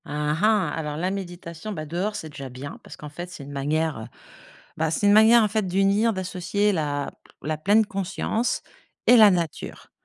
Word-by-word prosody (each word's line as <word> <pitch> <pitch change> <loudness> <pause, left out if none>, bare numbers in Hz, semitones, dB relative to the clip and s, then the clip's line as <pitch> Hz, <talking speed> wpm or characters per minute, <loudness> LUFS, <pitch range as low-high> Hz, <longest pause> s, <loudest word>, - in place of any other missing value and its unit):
Ah 150 +1 -1
ah! 210 -5 +3
Alors 150 -2 -4
la 180 +4 -1
méditation, 175 -1 -6
bah, 155 -4 -5
dehors, 180 +7 -2
c'est 160 - -6
déjà 140 -2 -8
bien, 130 +3 -8
parce - - -11
qu'en 150 - -9
fait, 175 +4 -8
c'est 170 -5 -9
une 140 - -10
manière, 145 -3 -1 0.7
bah, 160 0 0
c'est 165 - 0
une 205 - +6
manière, 220 +2 +7
en - - +3
fait, 210 -1 -1
d'unir 195 +5 +2
d'associer 190 +2 -1
la 145 -4 -2 0.3
la 155 +1 -2
pleine 205 +7 +3
conscience 200 +4 -2 0.5
et 245 - +8
la 215 -2 +9
nature. 170 -4 -4
175 Hz, 185 wpm, -24 LUFS, 150-205 Hz, 0.7 s, la